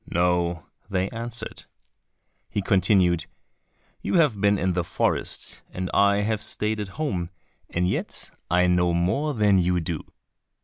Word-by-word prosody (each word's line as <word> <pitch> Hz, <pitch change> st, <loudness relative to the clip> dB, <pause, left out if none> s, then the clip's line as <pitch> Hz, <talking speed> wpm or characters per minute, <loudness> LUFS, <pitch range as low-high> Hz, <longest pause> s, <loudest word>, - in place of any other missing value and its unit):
"No," 85 Hz, -1 st, +1 dB, 0.2 s
they 95 Hz, -1 st, 0 dB
answered. 115 Hz, +1 st, -5 dB, 0.8 s
He 100 Hz, -1 st, -2 dB
continued, 90 Hz, -4 st, +3 dB, 0.7 s
"You -, -, -1 dB
have 145 Hz, -, +3 dB
been 100 Hz, 0 st, +4 dB
in 95 Hz, 0 st, 0 dB
the 90 Hz, 0 st, 0 dB
forest 85 Hz, -, -1 dB
and 90 Hz, 0 st, -4 dB
I 100 Hz, 0 st, +4 dB
have 110 Hz, 0 st, -1 dB
stayed 105 Hz, 0 st, -2 dB
at 105 Hz, -, -3 dB
home, 95 Hz, -, -2 dB, 0.4 s
and 90 Hz, +1 st, 0 dB
yet 95 Hz, -, -2 dB, 0.2 s
I 90 Hz, +1 st, +4 dB
know 90 Hz, -1 st, +3 dB
more 135 Hz, -, 0 dB
than 105 Hz, -3 st, +4 dB
you 90 Hz, 0 st, +2 dB
do." 80 Hz, -1 st, -3 dB
95 Hz, 140 wpm, -25 LUFS, 90-105 Hz, 0.8 s, been